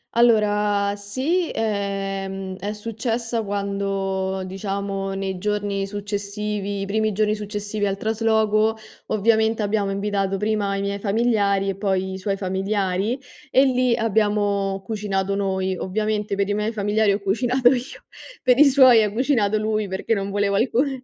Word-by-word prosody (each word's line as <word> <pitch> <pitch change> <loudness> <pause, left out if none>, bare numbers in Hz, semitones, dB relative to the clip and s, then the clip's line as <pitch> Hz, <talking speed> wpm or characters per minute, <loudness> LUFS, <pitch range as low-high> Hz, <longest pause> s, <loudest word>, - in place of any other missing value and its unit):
Allora 210 -3 +3
sì, 265 - -1
ehm, 195 -2 -3
è 205 +3 -4
successa 230 +2 -3
quando, 195 -1 -2
diciamo 195 0 -3
nei 195 -1 -3
giorni 205 0 -1
successivi 205 0 -4
i - - -2
primi 215 +1 0
giorni 210 +1 +1
successivi 210 0 -3
al 195 - -1
trasloco, 220 0 +1 0.3
ovviamente 220 +1 +2
abbiamo 205 -1 0
invitato 195 -1 -1
prima 205 0 0
i 195 - -2
miei 200 0 -2
familiari 200 -2 +1
e 195 - -2
poi 190 -2 -1
i 190 - -5
suoi 195 +1 -2
familiari 195 +3 -1 0.3
e 265 - +5
lì 255 -2 +2
abbiamo 205 -3 +1
cucinato 200 -2 -2
noi. 190 -1 -1
Ovviamente 210 +2 -1
per 200 0 0
i 205 - +1
miei 210 +2 -1
familiari 205 0 +2
ho 200 - -2
cucinato 245 +5 +2
io, 255 0 -3 0.4
per 250 -1 +4
i 300 - +9
suoi 260 -5 +7
ha 210 - -1
cucinato 225 -4 +2
lui 215 -1 -1
perché 190 +3 -4
io 225 - +4
non 195 - -4
volevo 200 0 0
alcuna 245 +6 +2
205 Hz, 150 wpm, -22 LUFS, 195-220 Hz, 0.4 s, i